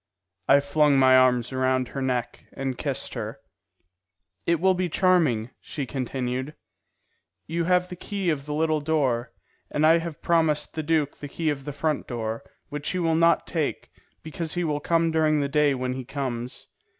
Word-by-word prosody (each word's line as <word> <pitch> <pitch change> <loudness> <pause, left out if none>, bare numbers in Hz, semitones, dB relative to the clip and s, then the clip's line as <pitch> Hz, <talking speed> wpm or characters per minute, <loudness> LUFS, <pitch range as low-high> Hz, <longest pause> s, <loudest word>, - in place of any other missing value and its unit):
I 140 +1 +6
flung 145 0 +3
my 130 -1 +6
arms 125 -1 +3
around 130 -1 +1
her 135 - -5
neck 125 -2 -2
and 135 -1 -3
kissed - - -3
her. - - -5 1.1
"It 170 -1 +3
will 190 +2 +4
be 180 -1 -1
charming," 155 - +2
she 145 - -5
continued. 130 +2 -3 0.9
"You 170 +1 -2
have 180 +1 +3
the 180 - -7
key 190 -1 -2
of 145 -2 -4
the 150 - -3
little 155 -1 +1
door, 130 -6 0 0.4
and 150 - +1
I 165 +2 +6
have 165 -2 -6
promised 160 -3 +1
the 160 - -2
duke 155 -2 0
the 145 - -7
key 160 +1 -1
of 135 -2 -6
the 145 - -4
front 150 +1 -2
door, 115 -1 -3 0.3
which 145 -1 -4
he 185 - -2
will 165 -2 +1
not 165 +1 +3
take, 160 -4 -3 0.3
because 160 0 -5
he 175 - 0
will 150 -3 -1
come 165 +1 +1
during 155 -1 +2
the 140 - 0
day 145 0 +2
when 125 0 -2
he 130 0 -5
comes. 125 -2 -4
150 Hz, 180 wpm, -25 LUFS, 130-165 Hz, 1.1 s, I